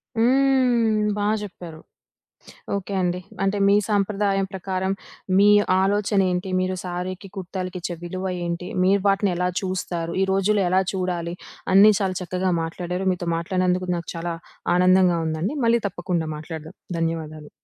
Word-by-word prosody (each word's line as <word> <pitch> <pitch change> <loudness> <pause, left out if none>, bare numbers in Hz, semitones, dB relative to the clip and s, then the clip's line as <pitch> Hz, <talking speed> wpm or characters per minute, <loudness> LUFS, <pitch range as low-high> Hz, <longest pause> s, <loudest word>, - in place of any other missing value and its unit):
హ్మ్. 245 -3 +3
బా 205 - 0 0.2
చెప్పారు. 175 -5 -9 1.0
ఓకే 200 0 -5
అండి. 180 0 0 0.2
అంటే 195 +1 +1
మీ 200 - +5
సాంప్రదాయం 200 -1 +1
ప్రకారం, 190 0 -2 0.5
మీ 205 +1 +6 0.3
ఆలోచనేంటి? 195 -2 +1
మీరు 185 0 -1
సారీకి, 180 +2 -5
కుర్తాలకి 185 0 -5
ఇచ్చే 175 0 -4
విలువ 185 +2 -5 0.2
ఏంటి? 170 +1 -3 0.2
మీరు 200 +2 +4
వాటిని 195 0 +2
ఎలా 180 0 +1
చూస్తారు? 175 -3 -3
ఈ - - +4
రోజుల్లో 195 +1 +2
ఎలా 190 +1 +4
చూడాలి? 175 -2 -2 0.4
అన్నీ 210 +2 +8
చాలా 190 -2 -1
చక్కగా 185 +1 -1
మాట్లాడారు. 180 +3 -4
మీతో 175 -1 -4
మాట్లాడినందుకు 185 +1 0
నాకు 170 - -6
చాలా 170 0 -3 0.4
ఆనందంగా 180 -1 +4
ఉందండి. 160 - -2
మళ్ళీ 230 0 +4
తప్పకుండా 175 -3 -2
మాట్లాడుదాం. 160 +2 -8 0.2
ధన్యవాదాలు. 155 -2 -3
185 Hz, 135 wpm, -23 LUFS, 175-195 Hz, 1.0 s, అన్నీ